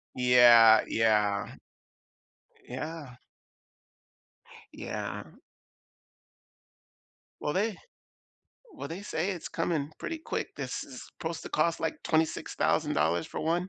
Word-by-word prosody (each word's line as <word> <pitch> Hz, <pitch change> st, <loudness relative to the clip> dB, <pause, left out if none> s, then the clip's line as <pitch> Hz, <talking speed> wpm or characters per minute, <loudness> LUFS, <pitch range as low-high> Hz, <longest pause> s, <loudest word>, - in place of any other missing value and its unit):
Yeah, 120 Hz, -3 st, +7 dB
yeah. 105 Hz, -3 st, +1 dB, 1.2 s
Yeah. 145 Hz, 0 st, -6 dB, 1.6 s
Yeah. -, -, -5 dB, 2.2 s
Well, 150 Hz, -, -2 dB
they 205 Hz, +2 st, 0 dB, 1.0 s
well, 300 Hz, -, -6 dB
they 175 Hz, +5 st, -7 dB
say 185 Hz, -2 st, -2 dB
it's 175 Hz, -4 st, -7 dB
coming 160 Hz, -3 st, -2 dB
pretty 330 Hz, -, -4 dB
quick, 315 Hz, -, -5 dB
this -, -, -4 dB
is -, -, -10 dB, 0.2 s
supposed 165 Hz, 0 st, -4 dB
to -, -, -7 dB
cost 165 Hz, +2 st, 0 dB
like 160 Hz, -1 st, -3 dB
$26,000 85 Hz, -, 0 dB
for -, -, -6 dB
one. 175 Hz, +3 st, 0 dB
155 Hz, 95 wpm, -29 LUFS, 120-170 Hz, 2.2 s, Yeah